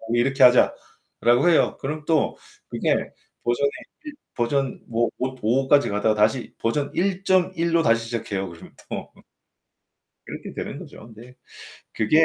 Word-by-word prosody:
이렇게 135 +3 +2
하자." 125 0 +6 0.5
라고 120 +8 +4
해요. 165 - +3
그럼 150 +2 -4
또 160 -2 +1 0.3
그게 - - -1 0.3
버전에 120 +4 +1 0.7
버전 130 +2 -1
뭐 115 0 0
오 130 +1 -2
5 130 +5 +1
까지 145 -4 +4
가다가 105 +2 +1
다시 110 +4 +1
버전 140 +5 -1
1.1 185 -2 +1
로 165 - +4
다시 115 -4 +2
시작해요, 100 -5 -3
그러면 85 -1 -13 0.2
또. - - -6 1.1
그렇게 - - -8
되는 - - -5
거죠. 110 +2 -12
근데 120 +3 -14 0.6
그게 155 +9 +4
125 Hz, 255 characters per minute, -23 LUFS, 115-150 Hz, 1.1 s, 하자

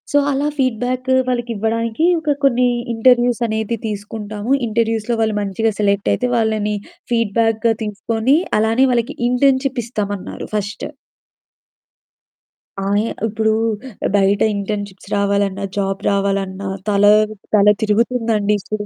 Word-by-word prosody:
So 290 - +2
అలా 280 +1 0
ఫీడ్‌బ్యాక్కు 255 0 0
వాళ్ళకి 240 -1 -1
ఇవ్వడానికి 225 +6 0
ఒక 305 -2 0
కొన్ని 250 -2 +4 0.3
ఇంటర్వ్యూస్ 245 +1 +3
అనేది 220 +1 -2
తీసుకుంటాము. 210 +1 -5 0.2
ఇంటర్వ్యూస్‌లో 225 +1 0
వాళ్ళు 220 -1 +1
మంచిగా 205 +3 0
సెలెక్ట్ 200 -1 +1
అయితే. 250 - -1
వాళ్ళని 215 -2 0 0.4
ఫీడ్‌బ్యాక్‌గా 225 0 +1
తీసుకొని 225 +5 0 0.2
అలానే 225 +4 +3
వాళ్ళకి 235 -1 0
ఇంటర్న్‌షిప్ 260 +1 +2
ఇస్తామన్నారు 205 -4 -4
ఫస్టు. 205 0 -3 2.0
ఆయా 205 +3 +1 0.2
ఇప్పుడు 220 0 0 0.6
బయట 200 0 +3
ఇంటర్న్‌షిప్స్ 200 -1 -5
రావాలన్నా 200 -1 0
జాబ్ 195 -1 -1
రావాలన్నా 195 -1 -1 0.2
తల 200 -1 +2 0.5
తల 205 -1 +5 0.2
తిరుగుతుందండి 220 -1 +1
ఇప్పుడు 210 +1 -4
220 Hz, 110 wpm, -18 LUFS, 205-240 Hz, 2.0 s, తల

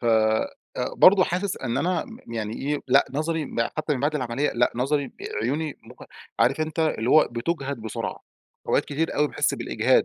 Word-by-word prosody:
فبرضو 115 - +3
حاسس 185 +2 -2
أن 120 -2 -2
أنا 180 +2 0
م 225 - -12
يعني 110 -1 -3
إيه، 145 +2 -1
لأ 135 +2 +6
نظري 160 +2 -1
ب 120 - -4 0.2
حتى 155 -1 0
من 130 - -4
بعد 145 +2 +1
العملية، 130 +1 0
لأ 120 +1 +2
نظري 135 +2 0 0.3
عيوني 145 +6 -2
مج - - -13 0.3
عارف 135 +5 +3
أنت 155 +1 -3
اللي 125 -7 +1
هو 155 - +6
بتُجهَد 140 +3 -2
بسرعة. 110 - -4 0.5
أوقات - - +2
كتير 155 +3 -2
أوي 150 0 +3
باحس - - 0
بالإجهاد - - +2
145 Hz, 175 wpm, -25 LUFS, 120-155 Hz, 0.5 s, لأ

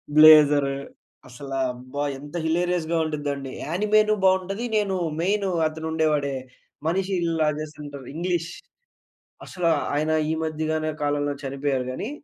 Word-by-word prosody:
Blazer. 150 -3 +7 0.5
అసల 135 +2 -9 0.2
అబ్బ! 125 +2 -13 0.3
ఎంత 145 +4 -11
హిలేరియస్‌గా 170 0 0
ఉంటుందండి. 145 -3 -3
యాణిమేటెడ్ 210 +6 +2
బావుంటది. 190 +4 +1
నేను 200 -2 0 0.2
మెయిను 195 +3 +1 0.2
అతను 160 +1 -6
ఉండేవాడే, 150 -3 +1 0.5
మనిషి 190 +3 0
ఇలా 165 -2 +1
చేస్తుంటారు, 145 -3 -8
ఇంగ్లీష్. 170 0 -1 0.9
అసల 180 -2 -4 0.3
ఆయన 155 +2 +1 0.2
ఈ - - +1
మధ్యగనే 155 0 -1
కాలంలో 145 0 0
చనిపోయారు. 135 -1 -1
కానీ, 205 - -4
155 Hz, 115 wpm, -24 LUFS, 145-180 Hz, 0.9 s, Blazer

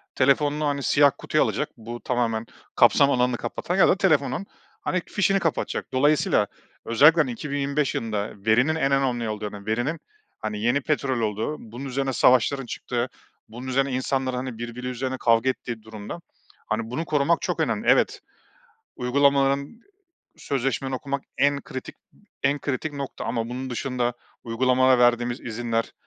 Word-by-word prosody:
telefonunu 145 +3 +2
hani 140 -1 -1
siyah 145 0 +5
kutuya - - +1
alacak, - - -1
bu 120 +1 -7
tamamen 115 -3 -1 0.3
kapsam 140 0 +5
alanını 125 -1 +2
kapatacak - - -3
ya - - +7
da - - +3
telefonun 195 - +1 0.4
hani 185 - -1
fişini 195 -1 +2
kapatacak. 165 -4 -1
Dolayısıyla 130 -6 +3 0.4
özellikle 150 +8 +6
hani 130 -5 -1
2025 140 +2 -1
yılında 105 -2 -2
verinin 125 +8 +3
en 140 -4 +1
önemli 125 -4 +1
olduğunu, 105 -1 -5
verinin, 120 +9 -1 0.4
hani, 105 -1 -4
yeni 120 +5 +2
petrol 135 -4 0
olduğu, 110 +7 -1
bunun 120 +4 -9
üzerine 135 0 -2
savaşların 130 +2 +3
çıktığı, 120 +1 -3 0.4
bunun 120 +4 -8
üzerine 135 +1 +1
insanların 130 0 -1
hani 125 -2 -4
birbiri 120 +2 -6
üzerine 130 +1 -3
kavga 115 +2 +3
ettiği 120 -3 -4
durumda, 110 +7 -8 0.5
hani, 110 0 -2
bunu 145 +7 -3
korumak 155 +1 +2
çok - - -2
önemli. - - -1
Evet, - - +3 0.7
uygulamaların, 140 - +2 0.6
sözleşmeni 135 0 -2
okumak 140 +1 -3 0.2
en 140 +1 +3
kritik, 130 -2 -8 0.5
en 145 +1 +2
kritik 145 +2 -3
nokta 140 -1 -6
ama 115 -1 -2
bunun 130 +1 -5
dışında 125 -1 -1 0.3
uygulamalara 130 +2 +3
verdiğimiz 120 0 +2
izinler, 115 0 -2
130 Hz, 145 wpm, -24 LUFS, 120-140 Hz, 0.7 s, ya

